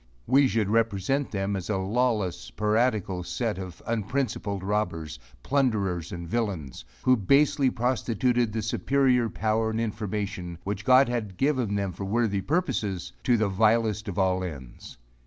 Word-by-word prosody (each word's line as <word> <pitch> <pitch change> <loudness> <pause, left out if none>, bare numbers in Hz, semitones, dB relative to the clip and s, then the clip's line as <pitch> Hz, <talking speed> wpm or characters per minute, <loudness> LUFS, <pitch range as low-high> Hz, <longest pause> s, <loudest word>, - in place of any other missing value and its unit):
We 135 +2 +5
should 110 -5 0
represent 115 +4 +1
them 100 0 -2
as 95 0 -5
a 105 - +1
lawless, 100 -3 0
piratical 105 -4 0
set 95 +4 -2
of 90 -2 -8
unprincipled 110 -3 -2
robbers, 90 -8 -2 0.2
plunderers 100 - 0
and 85 -1 -6
villains, 95 - -3 0.2
who 130 0 +5
basely 140 +5 +3
prostituted 120 -1 0
the 110 0 -3
superior 125 +1 +2
power 110 +1 0
and 110 0 -2
information, 105 -5 -3
which 100 +1 -4
God 130 +1 +6
had 110 -6 -3
given 130 -7 +1
them 100 -2 -1
for 95 +3 -6
worthy 105 -1 0
purposes 105 - -1
to 120 -2 +4
the 110 -1 +2
vilest 110 +1 +2
of 100 -2 -5
all 95 -1 +2
ends. 70 -11 -8
105 Hz, 145 wpm, -27 LUFS, 95-120 Hz, 0.2 s, God